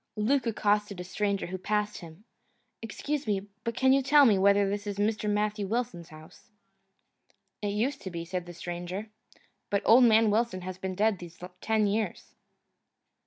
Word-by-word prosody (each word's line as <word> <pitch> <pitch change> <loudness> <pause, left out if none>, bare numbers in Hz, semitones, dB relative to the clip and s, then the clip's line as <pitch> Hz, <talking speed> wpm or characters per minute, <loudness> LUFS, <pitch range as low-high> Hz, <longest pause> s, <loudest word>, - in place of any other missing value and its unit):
Luke 245 +4 +1
accosted 210 -3 0
a - - -4
stranger 200 +2 -2
who 185 +2 -6
passed 210 +2 -1
him. 170 +3 -13 0.6
"Excuse 280 +6 -4
me, 200 -1 -1 0.2
but 230 -1 -3
can 265 0 +4
you 275 - +4
tell 285 +2 +6
me 220 -5 +5
whether 200 +1 +4
this 205 +1 -3
is 200 -1 -4
Mr. 210 +1 0
Matthew 210 0 -1
Wilson's 200 -7 -3
house?" 155 +3 -15 1.1
"It 210 - -2
used 255 +7 -1
to 190 - -6
be," 170 -1 -6
said 180 0 -4
the 175 - -8
stranger, 175 +5 -6 0.6
"but 200 0 0
old 245 +3 +7
man 220 -1 +5
Wilson 215 -3 0
has 185 0 -7
been 190 -1 -4
dead 210 -1 +1
these 170 -1 -11 0.2
ten 220 -1 +1
years." 210 +2 -2
205 Hz, 170 wpm, -28 LUFS, 185-220 Hz, 1.1 s, old